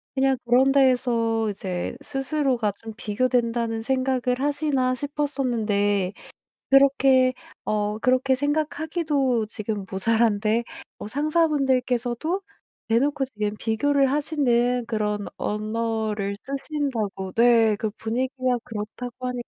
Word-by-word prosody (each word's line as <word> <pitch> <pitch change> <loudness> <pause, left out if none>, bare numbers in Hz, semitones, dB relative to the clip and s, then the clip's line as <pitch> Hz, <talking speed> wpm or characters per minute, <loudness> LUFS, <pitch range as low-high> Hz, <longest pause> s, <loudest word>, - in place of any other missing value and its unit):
그냥 270 0 +3
그런 255 +3 +4
데에서 240 -5 +2
이제 185 +1 -4
스스로가 270 -5 0
좀 225 -1 -7
비교된다는 230 0 0
생각을 255 -1 0
하시나.' 280 -3 +1
싶었었는데 230 -9 0 0.6
그렇게 270 -2 +5 0.3
어 210 0 -1
그렇게 255 +2 +2
생각하기도 290 -4 0
지금 215 -2 -4
모자란데 220 +2 +1 0.4
어 - - -6
상사분들께서도 280 - 0 0.5
대놓고 270 +5 +1
지금 210 -4 -3
비교를 270 +4 +2
하시는 250 -5 +1
그런 210 -2 -2
언어를 215 -1 -2
쓰신다고 270 -9 -3
네. 230 -2 +4
그 220 - -2
분위기가 255 +2 -1
그렇다고 240 +4 -6
하니까 245 -1 -4
245 Hz, 275 characters per minute, -24 LUFS, 220-270 Hz, 0.6 s, 그렇게